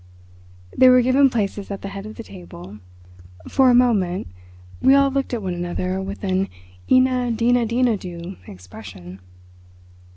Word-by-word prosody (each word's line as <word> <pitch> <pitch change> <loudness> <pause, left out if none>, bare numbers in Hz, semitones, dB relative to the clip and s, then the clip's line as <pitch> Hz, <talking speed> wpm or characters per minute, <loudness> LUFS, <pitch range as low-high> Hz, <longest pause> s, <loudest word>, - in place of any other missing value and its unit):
They 255 - +6
were 250 -1 +6
given 270 +2 +4
places 205 -4 -3
at 200 -1 -6
the 195 - -5
head 200 +1 -8
of 215 - -10
the 230 - -8
table. 90 - -12 0.7
For 265 -2 +3
a 245 - +5
moment 205 -8 +2 0.6
we 270 - +5
all 275 0 +4
looked 275 0 -2
at 235 -4 -3
one 185 -1 -3
another 180 +2 -3
with 195 +2 -7
an 190 0 0 0.4
eena 255 -1 +3
deena 235 +1 +1
dina 235 -1 +1
do 175 0 -8
expression. 90 0 -11
205 Hz, 155 wpm, -21 LUFS, 180-250 Hz, 0.7 s, They